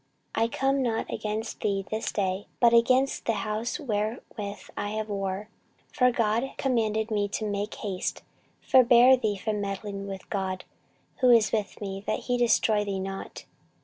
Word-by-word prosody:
I 225 Hz, +1 st, +2 dB
come 270 Hz, +3 st, +1 dB
not 230 Hz, -3 st, -1 dB
against 215 Hz, +1 st, -3 dB
thee 195 Hz, -2 st, -1 dB
this 220 Hz, +1 st, -2 dB
day, 190 Hz, -1 st, -1 dB
but 235 Hz, -1 st, +5 dB
against 255 Hz, +3 st, +3 dB
the 230 Hz, -, +2 dB
house 215 Hz, +7 st, -2 dB
wherewith 210 Hz, -4 st, -4 dB
I 205 Hz, -, -3 dB
have 215 Hz, 0 st, -3 dB
war: 195 Hz, 0 st, -3 dB, 0.5 s
for 250 Hz, -1 st, +4 dB
God 230 Hz, +2 st, 0 dB
commanded 220 Hz, -4 st, 0 dB
me 205 Hz, -1 st, +1 dB
to 210 Hz, +2 st, -3 dB
make 205 Hz, +1 st, -3 dB
haste: 190 Hz, -3 st, -3 dB, 0.4 s
forbear 255 Hz, 0 st, +7 dB
thee 215 Hz, -5 st, -1 dB
from 210 Hz, +1 st, -2 dB
meddling 200 Hz, 0 st, -4 dB
with 195 Hz, -1 st, -7 dB
God, 190 Hz, -2 st, -2 dB, 0.5 s
who 255 Hz, -, +4 dB
is 230 Hz, -3 st, +5 dB
with 210 Hz, -3 st, -2 dB
me, 195 Hz, -1 st, -5 dB
that -, -, -1 dB
he 245 Hz, -, -1 dB
destroy 220 Hz, -3 st, +3 dB
thee 200 Hz, -2 st, -3 dB
not. 195 Hz, 0 st, -6 dB
215 Hz, 160 wpm, -27 LUFS, 200-235 Hz, 0.5 s, forbear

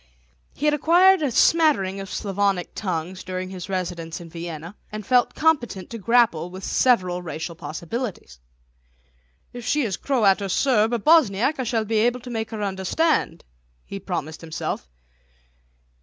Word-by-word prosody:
He 295 Hz, -, -3 dB
had 300 Hz, -, +4 dB
acquired 350 Hz, +5 st, +5 dB
a 290 Hz, -, +1 dB
smattering 245 Hz, -, +3 dB
of 195 Hz, -1 st, -7 dB
Slavonic 195 Hz, -2 st, -1 dB
tongues 185 Hz, -1 st, -4 dB
during 185 Hz, 0 st, -5 dB
his 185 Hz, 0 st, -7 dB
residence 175 Hz, -3 st, -4 dB
in 170 Hz, -2 st, -11 dB
Vienna, 170 Hz, +1 st, -7 dB, 0.2 s
and 215 Hz, -1 st, -6 dB
felt 250 Hz, 0 st, +3 dB
competent 250 Hz, -, 0 dB
to 230 Hz, -, -6 dB
grapple 220 Hz, -6 st, +2 dB
with 190 Hz, +2 st, -9 dB
several 185 Hz, -9 st, +2 dB
racial 165 Hz, 0 st, -5 dB
possibilities. 165 Hz, -, -6 dB, 1.1 s
"If 245 Hz, -1 st, -8 dB
she 295 Hz, +5 st, +1 dB
is 205 Hz, -6 st, -2 dB
Croat 215 Hz, -8 st, +2 dB
or 200 Hz, -, -3 dB
Serb 225 Hz, 0 st, +2 dB
or 240 Hz, -, +1 dB
Bosniak 265 Hz, -1 st, +3 dB
I -, -, 0 dB
shall 225 Hz, -2 st, -1 dB
be 220 Hz, +1 st, 0 dB
able 240 Hz, +3 st, +2 dB
to 250 Hz, 0 st, -8 dB
make 225 Hz, -1 st, -3 dB
her 220 Hz, -2 st, -4 dB
understand," 200 Hz, -, 0 dB, 0.4 s
he 195 Hz, -, -7 dB
promised 170 Hz, -5 st, -5 dB
himself. 160 Hz, -, -5 dB
200 Hz, 155 wpm, -23 LUFS, 180-245 Hz, 1.1 s, acquired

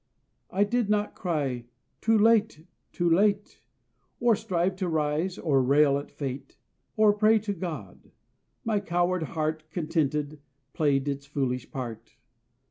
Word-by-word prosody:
I 195 Hz, -, +2 dB
did 235 Hz, 0 st, 0 dB
not 210 Hz, 0 st, +1 dB
cry 140 Hz, -9 st, -2 dB, 0.4 s
"Too 225 Hz, 0 st, +3 dB
late! 215 Hz, -7 st, +3 dB, 0.3 s
too 175 Hz, -, -1 dB
late!" 200 Hz, -, +2 dB, 0.6 s
Or 240 Hz, -2 st, +4 dB
strive 185 Hz, -1 st, -1 dB
to 190 Hz, -2 st, -2 dB
rise, 160 Hz, +3 st, 0 dB
or 140 Hz, -5 st, +2 dB
rail 140 Hz, +2 st, +4 dB
at 145 Hz, -, -9 dB
Fate, 135 Hz, -2 st, -6 dB, 0.4 s
Or 215 Hz, -1 st, +5 dB
pray 215 Hz, +2 st, +4 dB
to 210 Hz, -1 st, -2 dB
God. 155 Hz, -, -7 dB, 0.6 s
My 220 Hz, -2 st, +1 dB
coward 175 Hz, 0 st, 0 dB
heart, 155 Hz, 0 st, -3 dB
Contented, 155 Hz, -2 st, -1 dB, 0.3 s
played 145 Hz, -2 st, +1 dB
its 140 Hz, 0 st, -3 dB
foolish 130 Hz, -3 st, -2 dB
part. 120 Hz, -4 st, -7 dB
165 Hz, 130 wpm, -27 LUFS, 145-200 Hz, 0.6 s, Or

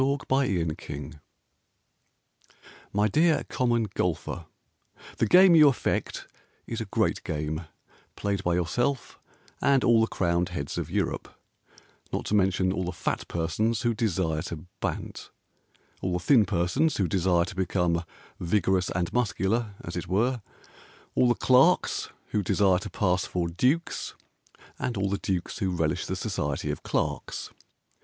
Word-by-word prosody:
TO 140 Hz, +1 st, +2 dB
THE -, -, -14 dB
COMMON 95 Hz, -, +1 dB
GOLFER 75 Hz, +1 st, -7 dB, 1.7 s
My 105 Hz, +1 st, +2 dB
dear 155 Hz, -, +3 dB
Common 120 Hz, -2 st, +1 dB
Golfer, 85 Hz, -1 st, -2 dB, 0.7 s
The 115 Hz, -, +2 dB
game 185 Hz, -, +7 dB
you 155 Hz, -3 st, +8 dB
affect 135 Hz, -, -1 dB, 0.4 s
Is -, -, -4 dB
a -, -, -3 dB
great -, -, 0 dB
game 80 Hz, +2 st, -3 dB, 0.5 s
Played 100 Hz, -2 st, -2 dB
by 85 Hz, -1 st, +1 dB
yourself 120 Hz, +10 st, -1 dB, 0.4 s
And 140 Hz, -2 st, +3 dB
all 115 Hz, -1 st, +5 dB
the 110 Hz, -, +3 dB
crowned 85 Hz, -2 st, 0 dB
heads 70 Hz, -6 st, -4 dB
of -, -, -4 dB
Europe, -, -, -2 dB, 0.8 s
Not -, -, -2 dB
to -, -, -3 dB
mention 95 Hz, -2 st, +2 dB
all 90 Hz, -1 st, -2 dB
the 90 Hz, -, -2 dB
fat 90 Hz, -, -3 dB
persons 105 Hz, +8 st, -1 dB
who 120 Hz, -1 st, +2 dB
desire 95 Hz, -8 st, 0 dB
to 85 Hz, -1 st, -7 dB
bant, -, -, -4 dB, 0.7 s
All 90 Hz, -, -1 dB
the 90 Hz, -, 0 dB
thin 115 Hz, -, +5 dB
persons 105 Hz, -, +1 dB
who 95 Hz, -, +1 dB
desire 85 Hz, 0 st, +2 dB
to 90 Hz, -, -8 dB
become 90 Hz, -2 st, 0 dB, 0.4 s
Vigorous 95 Hz, 0 st, +1 dB
and 85 Hz, -1 st, -2 dB
muscular, 110 Hz, -2 st, 0 dB
as 85 Hz, -, -6 dB
it 90 Hz, -, -4 dB
were, 120 Hz, +6 st, +1 dB, 0.7 s
All 125 Hz, -, +4 dB
the 120 Hz, -, +3 dB
clerks 135 Hz, +8 st, +3 dB, 0.2 s
who 105 Hz, -, +1 dB
desire 95 Hz, -1 st, +3 dB
to 105 Hz, +2 st, -7 dB
pass 90 Hz, -3 st, +1 dB
for 90 Hz, -2 st, -1 dB
dukes, 130 Hz, -, 0 dB, 0.6 s
And 120 Hz, -, -2 dB
all 95 Hz, 0 st, 0 dB
the 100 Hz, -, -1 dB
dukes 90 Hz, +2 st, -3 dB
who 95 Hz, -4 st, 0 dB
relish 80 Hz, -4 st, -1 dB
the -, -, -2 dB
society -, -, -2 dB
of -, -, -5 dB
clerks. -, -, -2 dB
95 Hz, 150 wpm, -27 LUFS, 85-120 Hz, 1.7 s, you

